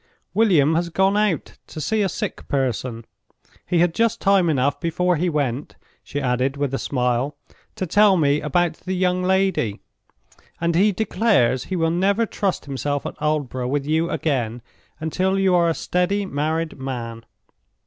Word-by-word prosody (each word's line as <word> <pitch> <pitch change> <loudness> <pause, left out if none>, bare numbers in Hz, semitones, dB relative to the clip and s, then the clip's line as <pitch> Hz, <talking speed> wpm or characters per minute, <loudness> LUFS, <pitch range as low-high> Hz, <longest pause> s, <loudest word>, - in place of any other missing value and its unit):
"William 170 -9 +4
has 170 +1 0
gone 190 +3 +2
out 210 -6 0
to - - -8
see 215 +8 0
a 195 - +1
sick - - -5
person. 125 -3 -2 0.6
He 175 - +1
had 175 -1 +2
just 230 +2 +1
time 195 -4 +3
enough 140 -1 +1
before 180 +1 +1
he 175 +3 0
went," 140 -4 -2 0.3
she 145 - -4
added, 130 +1 0
with 140 -2 -1
a 135 - -1
smile, 125 +1 -1 0.4
"to 185 - -2
tell 200 +2 +4
me 145 -2 +2
about 170 +3 +1
the 185 +1 -4
young 180 0 +1
lady; 190 - +1 0.8
and 170 0 0
he 195 +5 +4
declares 205 - +1
he 190 - -3
will 165 -2 +1
never 200 +6 +2
trust 200 -4 -2
himself 145 +1 -3
at - - -4
Aldborough 140 -5 -1
with 140 0 -1
you 160 +3 +1
again 120 -6 -2 0.4
until 185 +5 0
you 190 -1 +3
are 170 -1 +4
a 165 - 0
steady, 195 +3 0
married 160 -1 -2
man." 120 -4 -5
160 Hz, 165 wpm, -22 LUFS, 135-185 Hz, 0.8 s, William